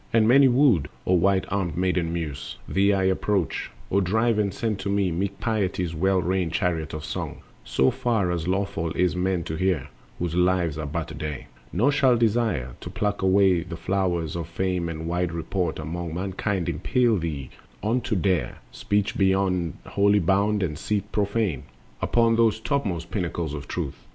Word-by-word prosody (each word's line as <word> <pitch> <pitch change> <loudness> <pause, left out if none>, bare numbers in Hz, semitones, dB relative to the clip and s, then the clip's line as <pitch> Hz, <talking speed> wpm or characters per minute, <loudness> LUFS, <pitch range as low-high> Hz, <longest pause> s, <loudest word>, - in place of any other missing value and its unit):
And 110 -1 +4
many 135 +3 +7
wooed, 120 - +4 0.2
O 90 - +2
white 95 +2 +3
armed 95 -5 -1
Maiden 90 -2 +1
Muse, 80 -5 -4
Thee 100 +1 +3
I 95 -1 +1
approach: 95 -1 0 0.2
O 100 - +3
drive 110 +4 +2
and 100 -2 +1
send 110 -2 -2
to 100 - -3
me 100 -2 +1
Meek 100 +4 -2
Piety's 95 -6 -1
well 95 +4 +2
reined 90 -1 0
chariot 80 -5 -1
of 75 0 -6
song, - - -5 0.2
So 65 +2 +2
far 110 -7 0
as 85 -1 -2
lawful 95 -3 -1
is 90 -1 +2
for 90 - -3
men 90 -1 0
to 80 - -4
hear, 80 -5 0 0.3
Whose 85 -2 -2
lives 90 -3 +1
are 75 - -3
but 80 +2 -4
a - - -7
day. 75 -5 -5 0.2
Nor 120 +11 +3
shall 130 -4 +4
desire 110 - +1
To - - -6
pluck 105 +1 -1
the 95 -3 +3
flowers 85 -3 -1
of 85 -1 -4
fame 90 0 -1
and 80 0 -5
wide 90 0 -1
report 85 +1 -2
Among 80 +1 -4
mankind 95 0 -2
impel 120 -4 +2
thee 75 -7 -4 0.3
on 115 +4 +1
to 110 - -2
dare 90 -1 0
Speech 105 +1 -1
beyond 95 -4 +1
holy 100 +1 +3
bound 100 +3 +2
and 75 -4 -3
seat 105 +1 -2
profane 100 - 0 0.4
Upon 115 -1 +3
those 115 -2 +3
topmost 100 - -2
pinnacles 85 -5 -2
of 75 -1 -6
Truth. - - -5
95 Hz, 175 wpm, -25 LUFS, 85-100 Hz, 0.4 s, many